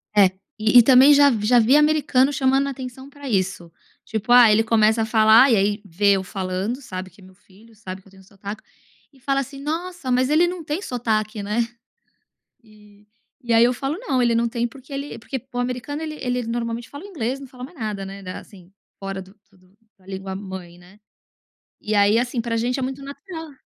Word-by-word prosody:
É, 205 -1 +7 0.3
e 220 +3 +6
e - - +7
também 265 +3 +7
já 285 0 +6
vi 220 -5 -1
já 245 +2 +5
vi 235 +5 +4
americano 295 -3 +3
chamando 270 0 +2
atenção 265 0 -7
pra 285 -1 -9
isso. 185 -5 -2 0.3
Tipo, 220 +1 -3
ah, 245 -3 +8
ele 215 +1 +4
começa 220 0 +3
a - - -1
falar 220 +4 +6
e - - +5
aí 205 +1 0
vê 200 +2 +2
eu 190 -1 -1
falando 190 +6 -4
sabe 185 -6 -7
que 195 - -21
é - - -16
meu 185 0 -17
filho, 205 +4 -21
sabe 190 -3 -9
que 195 - -24
eu - - -20
tenho 190 0 -18
sotaque, 200 +2 -9 0.5
e 270 - -22
fala 275 +2 0
assim: 275 +1 -9
"Nossa, 330 0 -4
mas 255 +1 +2
ele 320 +4 +4
não 350 -1 -5
tem 300 +4 -3
sotaque, 215 - -2
né?" 210 +3 -2 1.0
E, 210 -1 -21 0.4
e 240 -1 -2
aí 230 +1 +6
eu 245 - +3
falo: 270 +4 -3
"Não 280 - -1
ele 235 -1 +2
não 235 +1 +1
tem 235 0 -2
porque 270 +3 -15
ele" 280 +1 -5
porque 260 +3 -6
o 245 - -4
americano 250 +5 -3
ele 310 -1 -5
ele 250 -1 -1
normalmente 230 0 -4
fala 285 +5 -10
o - - -8
inglês 270 - -3
não 275 - -9
fala 250 -1 -10
mais 335 +7 -12
nada, 210 -4 -4
né, 195 +1 -9
assim 185 -3 -14 0.3
fora 195 -1 -5
do 190 +1 -17 0.2
do 185 0 -26 0.2
da 185 - -25
língua 190 0 -6
mãe, 190 -3 -8
né? 180 +4 -19 0.8
E 215 - -3
aí 205 +2 +4
assim 240 0 -1
pra 230 0 -2
gente 245 +3 -1
é - - -2
muito 265 +2 -4
natural. 310 +3 -9
230 Hz, 215 wpm, -22 LUFS, 205-270 Hz, 1.0 s, ah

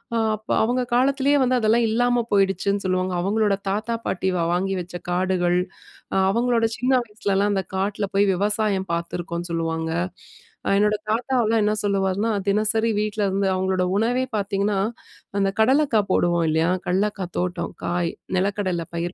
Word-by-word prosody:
அ - - +2 0.2
அப்ப 215 +1 -17
அவுங்க 245 +3 +1
காலத்துலயே 275 +2 +3
வந்து 255 0 +2
அதெல்லாம் 225 +1 +3
இல்லாம 245 +1 +2
போயிடுச்சுன்னு 195 0 +1
சொல்லுவாங்க. 185 0 0
அவுங்களோட 205 +1 +1
தாத்தா 215 +4 -1
பாட்டி 190 +1 -1
வா 170 - +1
வாங்கி 195 +2 0
வச்ச 175 +1 -10 0.2
காடுகள், 180 -1 +1 0.6
அ - - +1
அவங்களோட 235 0 +2
சின்ன 250 +2 0
வயசுலலாம் 205 -1 0
அந்த 190 -1 0
காட்ல 200 +1 -1
போய் 200 0 +4
விவசாயம் 205 0 0
பார்த்துருக்கோன்னு 170 +1 -4
சொல்லுவாங்க. 165 -1 -2 0.8
அ - - +2
என்னோட 210 0 +3 0.2
தாத்தாவுல்லாம் 230 -2 +1
என்ன 210 - +2
சொல்லுவாருன்னா, 200 +2 0 0.2
தினசரி 215 +2 +1
வீட்ல 210 0 -1
இருந்து 195 +1 0
அவுங்களோட 185 0 0
உணவே 245 +4 +1
பாத்தீங்கன்னா, 200 0 0 0.6
அந்த 195 0 +2
கடலக்கா 265 -1 +3
போடுவோம் 175 -1 +2
இல்லயா, 160 +2 +2 0.2
கடலக்கா 195 +1 0
தோட்டம். 180 -1 -3
காய், 175 -1 -1 0.2
நிலக்கடல 190 -3 -1
பயிர் 175 +2 -3
200 Hz, 145 wpm, -23 LUFS, 185-220 Hz, 0.8 s, போய்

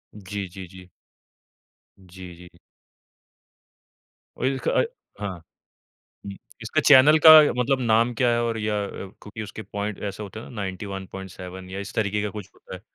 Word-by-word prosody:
जी, 100 -1 -6
जी, 95 +1 -10
जी। 90 0 -14 1.1
जी, 90 -1 -12
जी। 90 +1 -14 1.9
ओइलक 130 +1 -1
अए - - +2 0.3
हाँ। 100 -3 -4 0.9
हुँ। 100 - -5 0.3
इसका - - 0
चैनल 145 +2 +8
का - - +13 0.3
मतलब 135 +1 +1
नाम 115 0 +2
क्या 125 +1 +1
है? 120 - +1
और 115 -1 -2
या 105 -1 -1
क्योंकि 105 +3 -9
उसके 110 +1 -8
पॉइंट, 105 -1 -5
ऐसा 100 +1 -5
होता 105 +1 -8
हैं - - -11
ना - - -12
91.7 95 -1 -7
या 95 +1 -5
इस 100 - -8
तरीके 105 -1 0
का 105 - -2
कुछ 100 -1 -9
होता - - -12
है। 90 - -9
100 Hz, 155 wpm, -24 LUFS, 95-110 Hz, 1.9 s, का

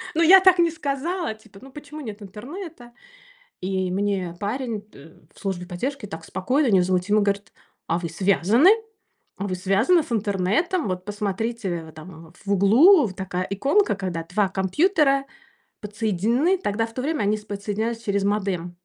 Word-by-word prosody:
ну, 330 - +2
я 375 +4 +9
так 370 -2 +5
не 340 -1 +4
сказала. 315 0 -3
Типа: 215 -2 -18
"Ну, 270 0 -13
почему 300 +1 -10
нет 215 -4 -8
интернета?" 245 - -9 0.7
И 185 0 -2
мне 190 -3 -2
парень 220 0 -3
т 165 -6 -17 0.2
в - - -20
службе 185 -3 -4
поддержки 235 +7 -4
так 165 -3 -8
спокойно 255 - 0
и - - +1
невозмутимо 185 +3 +2
говорит: 200 0 -1 0.4
"А 170 - +1
вы 170 -1 -4
связаны? 200 - +3 0.7
А 200 - -3
вы 185 - -2
связаны 205 - +3
с 240 - -8
интернетом? 215 - 0
Вот 180 0 -3
посмотрите, 205 -2 -3
а - - -13
там 160 0 -12
в 200 - -1
углу 255 - +6
вот 190 - -8
такая 185 -2 -3
иконка". 275 - +2
Когда 180 -4 -4
2 195 +3 0
компьютера 275 - +2 0.6
подсоединены, 225 - 0
тогда 225 - -1
в 225 - -14
то 255 - -3
время 300 -5 -1
они 210 +1 +1
с 210 - -12
подсоединялись 215 +3 -3
через 200 -1 -1
модем. 190 -4 -2
205 Hz, 165 wpm, -23 LUFS, 190-270 Hz, 0.7 s, я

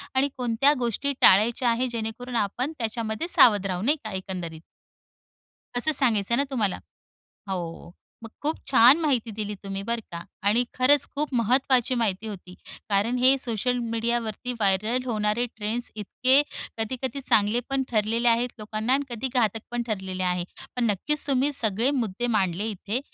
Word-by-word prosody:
आणि 270 +2 +3
कोणत्या 250 +4 +2
गोष्टी 250 +4 -1
टाळायच्या 230 +5 +5
आहे, 240 +2 +1
जेणेकरून 235 +2 -5
आपण 235 +7 -1
त्याच्यामध्ये 225 +4 -3
सावध 210 - +5
राहू 180 -2 -3
नाही 290 +9 +2
का, 215 - -6
एकंदरीत? 180 -4 -5 1.1
असं 245 +6 +2
सांगायचं 235 -6 +2
आहे - - +4
ना, - - +1
तुम्हाला? 215 -7 0 0.7
हो, 170 -3 -5 0.3
मग 230 - -8
खूप 310 +2 -1
छान 255 +4 +7
माहिती 255 -8 0
दिली 210 -1 -4
तुम्ही, 195 0 -4
बरं 230 +3 -2
का 170 0 -5 0.3
आणि 235 +4 +3
खरंच 280 +3 +4
खूप 290 -2 -2
महत्त्वाची 255 +2 +2
माहिती 220 -3 -1
होती, 185 -4 -8 0.3
कारण 210 +4 +1
हे 260 +2 +5
सोशल 245 0 -1
मीडियावरती 230 +1 -2
व्हायरल 220 +3 0
होणारे 215 +1 0
ट्रेंड्स, 225 +3 -3
इतके 255 +6 +2 0.4
कधी-कधी 255 +4 -3
चांगले 225 -2 +2
पण 270 0 +1
ठरलेले 230 +2 +1
आहेत 235 +2 +2
लोकांना 215 +3 -2
आणि 285 +1 +1
कधी 260 +3 -3
घातक 225 -3 +1
पण 240 0 -1
ठरलेले 190 -3 -3
आहे. 180 -1 0 0.3
पण 245 - +1
नक्कीच 300 +10 -1
तुम्ही 275 +1 +1
सगळे 225 0 +1
मुद्दे 240 -4 -2
मांडले 190 +1 0
इथे 205 +4 -3
230 Hz, 155 wpm, -25 LUFS, 210-255 Hz, 1.1 s, छान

